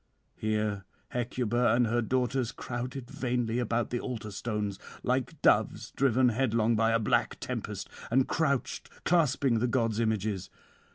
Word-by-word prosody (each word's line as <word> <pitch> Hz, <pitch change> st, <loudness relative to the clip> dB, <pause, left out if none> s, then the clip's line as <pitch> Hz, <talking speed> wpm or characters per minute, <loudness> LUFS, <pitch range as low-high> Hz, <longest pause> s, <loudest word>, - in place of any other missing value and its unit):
Here 105 Hz, -2 st, -1 dB, 0.2 s
Hecuba 120 Hz, -1 st, +1 dB
and 120 Hz, 0 st, +4 dB
her 120 Hz, +2 st, +1 dB
daughters 125 Hz, +1 st, 0 dB
crowded 125 Hz, +1 st, -5 dB
vainly 120 Hz, -2 st, -1 dB
about 120 Hz, -1 st, 0 dB
the 120 Hz, -, 0 dB
altar 115 Hz, -5 st, -5 dB
stones, 105 Hz, -1 st, -3 dB, 0.2 s
like 130 Hz, +4 st, -1 dB
doves -, -, +3 dB
driven 130 Hz, -1 st, +3 dB
headlong 115 Hz, -2 st, +2 dB
by 115 Hz, +1 st, +3 dB
a 115 Hz, -, +4 dB
black 110 Hz, -, +1 dB
tempest, -, -, -4 dB, 0.2 s
and 130 Hz, +2 st, +3 dB
crouched 140 Hz, -5 st, 0 dB, 0.2 s
clasping 140 Hz, -7 st, +3 dB
the 125 Hz, -, +1 dB
gods' 115 Hz, -3 st, +1 dB
images. 110 Hz, -4 st, -1 dB
120 Hz, 135 wpm, -30 LUFS, 110-125 Hz, 0.2 s, and